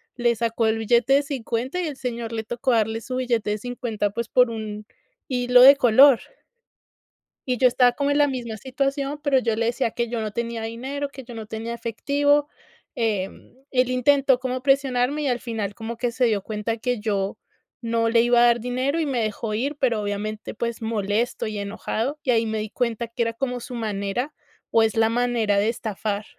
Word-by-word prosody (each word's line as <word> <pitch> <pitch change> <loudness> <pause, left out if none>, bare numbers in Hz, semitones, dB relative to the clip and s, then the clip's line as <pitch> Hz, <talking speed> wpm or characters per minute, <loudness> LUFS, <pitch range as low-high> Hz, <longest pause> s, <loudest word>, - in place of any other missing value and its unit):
le 240 -1 +2
sacó 230 0 0
el 220 0 +1
billete 235 +4 +3
de 280 - +5
$50, 260 +2 -3
y 360 - -1
el 285 -3 -6
señor 235 -2 -4
le 225 -1 -3
tocó 240 +3 -1
darle 220 0 +1
su 255 +2 -4
billete 235 -5 0
de 210 - -1
$50, 225 -3 -2
pues, 230 +2 -4
por 250 0 +4
un 215 -2 -6 0.4
hilo 250 -2 +4
de 275 +2 +10
color. 260 0 +6 1.3
Y 250 -1 0
yo 255 - +5
estaba 245 0 +4
como 285 +1 0
en 285 - +2
la 290 -1 +5
misma 240 -4 -4
situación, 275 +4 -2
pero 280 -3 +3
yo 230 -3 0
le 230 +1 0
decía 235 0 0
que 235 0 -2
yo 235 -2 -2
no 215 -1 -3
tenía 235 0 -3
dinero, 265 +5 -4
que 265 -1 -10
yo 240 0 -11
no 220 -1 -6
tenía 225 +2 -5
efectivo. 285 +6 +1 0.5
Em, 210 -4 -3 0.2
él 255 -1 +2
intentó 265 0 +3
como 255 0 -3
presionarme 270 +1 +1
y 285 - 0
al 245 -1 0
final 220 -4 -4
como 225 +1 -6
que 245 0 -1
se 250 +2 +1
dio 215 -4 +1
cuenta 215 +3 -3
que 245 +1 -2
yo 200 -2 -2 0.4
no 230 0 0
le 230 0 +4
iba 240 0 +4
a 240 - +7
dar 235 0 +3
dinero, 255 +6 -1
y 320 - 0
me 260 -5 -1
dejó 215 0 -3
ir. 270 +7 -1
Pero, 235 -5 +1
obviamente, 210 +1 -4
pues, 235 +1 -4
molesto 220 +1 -1
y 215 -1 -4
enojado, 220 +7 -3
y 255 - +2
ahí 230 -1 +2
me 220 0 -2
di 215 0 -4
cuenta 235 0 -2
que 230 +1 -5
era 230 0 0
como 250 +1 -3
su 250 - -8
manera, 220 +4 -3 0.4
o 225 - +5
es 220 0 0
la 225 0 +4
manera 235 -3 +1
de 205 +2 +2
estafar. 215 -2 -3
235 Hz, 205 wpm, -23 LUFS, 220-255 Hz, 1.3 s, de